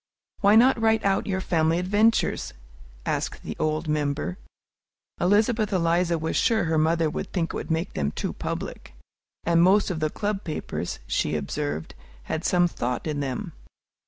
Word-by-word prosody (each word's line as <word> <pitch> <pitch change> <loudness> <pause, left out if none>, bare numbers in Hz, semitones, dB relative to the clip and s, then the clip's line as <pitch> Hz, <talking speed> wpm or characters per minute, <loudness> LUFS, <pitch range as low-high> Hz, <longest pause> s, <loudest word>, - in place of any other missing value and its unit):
"Why 205 +1 +5
not 240 +1 +5
write 220 -1 +2
out 195 -1 +1
your 190 -1 -1
family 165 -2 +2
adventures?" 205 +5 +2 0.5
asked - - -2
the - - -5
old 155 +1 0
member. 145 - -1 0.8
Elizabeth 215 +3 +2
Eliza 170 -1 +2
was 160 0 -2
sure 225 -4 +3
her 160 -2 +1
mother 165 +1 +2
would 155 - -4
think 170 -3 -1
it - - -5
made 165 +3 -1
them 70 -1 0
too - - -4
public; - - -6 0.5
and 170 0 +3
most 195 +3 +4
of 165 - -3
the 155 -1 0
Club 205 +3 -3
papers, 155 - -4
she - - 0
observed, 75 +2 -3 0.3
had 160 - -3
some 175 -1 +3
thought 125 -7 -3
in 150 -2 -2
them. 135 -3 -3
170 Hz, 160 wpm, -25 LUFS, 155-200 Hz, 0.8 s, Why